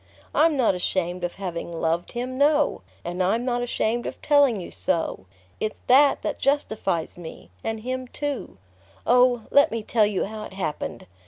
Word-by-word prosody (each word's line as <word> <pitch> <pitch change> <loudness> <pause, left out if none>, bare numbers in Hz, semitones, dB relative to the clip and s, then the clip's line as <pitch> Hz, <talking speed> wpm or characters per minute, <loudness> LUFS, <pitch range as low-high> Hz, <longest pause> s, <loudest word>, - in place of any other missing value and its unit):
I'm 315 -1 +4
not 240 -6 +3
ashamed 180 0 -1
of 175 - -2
having 175 -3 -5
loved 165 +1 -1
him; 250 +1 -3
no; 290 +2 +3 0.2
and 175 +2 -3
I'm 220 +7 +1
not 245 -1 0
ashamed 240 -1 -1
of - - -6
telling 285 -7 +4
you 180 - -8
so. 165 - -2 0.3
It's 215 - -3
that 275 +3 +5
that - - -2
justifies 215 - 0
me 160 - -10
and 225 -1 -3
him 255 +2 -4
too...Oh, 235 - -1
let 285 - +6
me 225 -1 -3
tell 215 -1 +3
you 205 -2 -1
how 215 +1 -6
it - - -11
happened! 180 -6 -4
220 Hz, 165 wpm, -25 LUFS, 175-255 Hz, 0.3 s, let